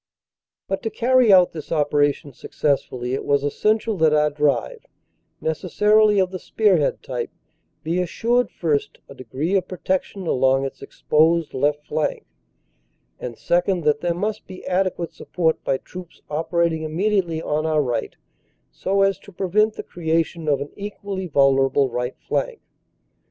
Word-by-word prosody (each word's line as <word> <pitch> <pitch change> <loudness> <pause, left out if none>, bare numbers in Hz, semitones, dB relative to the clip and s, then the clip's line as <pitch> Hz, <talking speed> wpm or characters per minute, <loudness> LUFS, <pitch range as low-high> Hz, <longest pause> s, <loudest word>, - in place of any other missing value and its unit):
But 195 - -2
to 225 - -2
carry 245 +1 +3
out 180 -2 +6
this 155 -2 -8
operation 145 -2 +1
successfully, 130 -3 -2
it 135 - -2
was 140 -1 +1
essential 215 +8 0
that 160 -2 +4
our 150 0 +3
drive, 145 - 0 0.6
necessarily 210 +6 +2
of 185 -1 +2
the 185 - -5
spearhead 190 -10 +1
type, 125 -3 -4 0.5
be 170 +3 0
assured, 235 +7 0
first, 150 -4 -1
a - - -11
degree 140 +6 -4
of 195 -2 +1
protection 185 +1 -3
along 135 -2 +2
its 135 - -7
exposed 160 +1 +1
left 145 +2 0
flank; 155 0 -2 0.9
and, 120 -2 -6
second, 175 0 +1
that 150 -1 +2
there 175 -1 0
must 210 +4 -3
be 185 0 -10
adequate 180 -3 -1
support 160 0 -1
by 135 - 0
troops 180 +4 -12
operat 165 +2 +1
ing 160 - -4
immediately 170 +1 0
on 155 0 -1
our 155 -2 +2
right 120 -3 -3 0.6
so 195 +1 0
as 195 -1 +1
to 200 - -15
prevent 210 +4 +1
the - - -6
creation 165 -1 -2
of 140 -2 +2
an 145 - -6
equally 200 -2 -5
vulnerable 135 -2 +3
right 125 +1 -3
flank. - - -2
165 Hz, 150 wpm, -22 LUFS, 145-190 Hz, 0.9 s, out